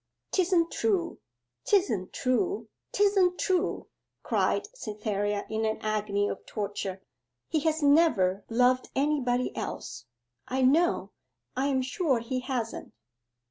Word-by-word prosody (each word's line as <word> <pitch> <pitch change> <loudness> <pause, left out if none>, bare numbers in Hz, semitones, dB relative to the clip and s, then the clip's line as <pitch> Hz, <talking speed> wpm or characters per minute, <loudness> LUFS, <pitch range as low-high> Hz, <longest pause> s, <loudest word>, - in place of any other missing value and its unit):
''Tisn't 355 -3 +2
true! 375 -6 0 0.4
'tisn't 235 - +1
true! 360 +11 0 0.2
'tisn't 390 -3 +3
true!' 370 0 0 0.4
cried - - +1
Cytherea 210 - -2
in 220 0 -2
an 220 0 0
agony 210 -1 0
of 195 - -5
torture. 200 -2 -4 0.5
'He 315 - +1
has 315 0 0
never 240 - +4
loved 250 +2 +3
anybody 265 -3 +1
else, 115 +1 -5 0.4
I 260 +1 0
know 320 +7 +3 0.4
I 265 +2 +1
am 265 -2 +1
sure 265 +1 +1
he 240 +3 -3
hasn't. 250 -3 -4
255 Hz, 115 wpm, -28 LUFS, 215-335 Hz, 0.5 s, never